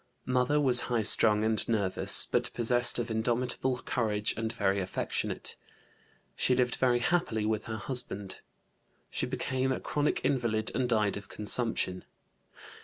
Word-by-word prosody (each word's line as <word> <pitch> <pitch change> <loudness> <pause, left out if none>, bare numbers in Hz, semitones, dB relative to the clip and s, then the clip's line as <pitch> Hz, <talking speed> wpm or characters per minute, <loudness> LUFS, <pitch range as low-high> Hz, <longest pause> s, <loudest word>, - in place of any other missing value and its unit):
Mother 130 +3 +1
was 130 -4 +6
high 120 -3 0
strung 105 0 +5
and 110 0 0
nervous, 100 -5 +1
but - - -1
possessed 120 +1 +3
of 120 -1 -3
indomitable 125 +3 -1
courage 105 -3 -1
and 110 0 -2
very 100 -3 0
affectionate; 95 -1 -3 0.8
she 125 - +2
lived 125 -1 +1
very 125 -2 +2
happily 120 -6 0
with 110 -1 -2
her 110 -1 -5
husband. 105 -5 -2 0.7
She - - -2
became 130 0 -2
a 130 - -2
chronic 150 0 -1
invalid 115 -5 0
and 125 -1 -1
died 105 -4 +1
of 100 -1 -10
consumption. 105 -4 -1
115 Hz, 140 wpm, -29 LUFS, 105-125 Hz, 0.8 s, was